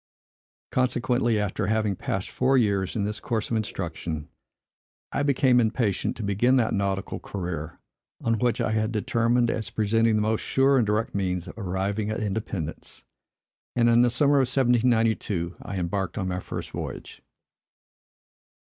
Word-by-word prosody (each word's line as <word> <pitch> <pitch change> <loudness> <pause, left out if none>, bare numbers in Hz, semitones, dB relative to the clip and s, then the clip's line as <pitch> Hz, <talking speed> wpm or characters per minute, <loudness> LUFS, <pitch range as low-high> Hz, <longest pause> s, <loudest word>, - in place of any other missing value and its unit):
Consequently, 120 -2 +1
after 105 0 -1
having 110 -2 +1
passed 95 +1 -3
four 130 +1 +2
years 100 -6 +1
in 105 - 0
this 105 +1 -2
course 110 -1 -2
of - - +1
instruction, 85 -7 -4 0.8
I - - -1
became 135 -3 +3
impatient 110 -3 0
to 115 - -5
begin 105 +6 +2
that 120 -4 +2
nautical 100 -1 -1
career 85 -5 -5 0.4
on 115 -1 0
which 120 -2 +1
I - - 0
had 110 +1 0
determined, 115 +2 +1
as 110 - -3
presenting 110 +1 +2
the 105 - +2
most 110 0 0
sure 135 +1 +3
and 115 - +1
direct 105 +2 0
means 90 -2 -1
of - - -9
arriving 100 +1 -2
at 110 - -2
independence; 100 -6 -4 0.7
and 120 -1 +4
in 115 0 +5
the 125 - +4
summer 140 +4 +3
of 135 -2 +3
1792 115 -8 +1
I 100 - -6
embarked 95 +1 -2
on 95 -3 -1
my 90 0 -2
first - - -6
voyage. - - -7
110 Hz, 155 wpm, -26 LUFS, 95-120 Hz, 0.8 s, in